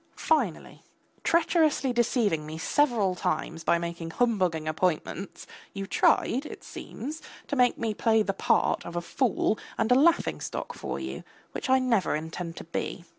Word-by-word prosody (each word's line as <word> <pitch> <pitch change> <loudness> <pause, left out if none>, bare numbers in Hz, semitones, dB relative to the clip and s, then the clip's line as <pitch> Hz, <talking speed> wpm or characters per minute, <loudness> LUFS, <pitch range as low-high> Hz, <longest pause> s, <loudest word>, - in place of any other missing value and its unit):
Finally, 265 - 0 0.4
treacherously 315 -6 +2
deceiving 230 - +1
me 155 +1 -7
several 225 - +2
times 165 -1 -2
by 170 - +3
making 170 -1 -5
humbugging 185 -7 +1
appointments, 175 +3 -2 0.3
you 195 0 -3
tried, 250 +6 +2
it 300 - -9
seems, 300 +6 -7 0.2
to 285 - -3
make 250 -2 +3
me 225 -2 -1
play 220 0 +3
the 195 - -1
part - - +1
of 170 - -8
a - - +1
fool 220 +2 0 0.2
and 225 +1 +1
a - - +9
laughing 325 +6 +3
stock - - -4
for - - -5
you, - - -6 0.3
which - - -5
I 260 - +6
never 240 -10 +1
intend 160 +2 -5
to - - -6
be. 170 +1 -4
210 Hz, 160 wpm, -27 LUFS, 170-255 Hz, 0.4 s, a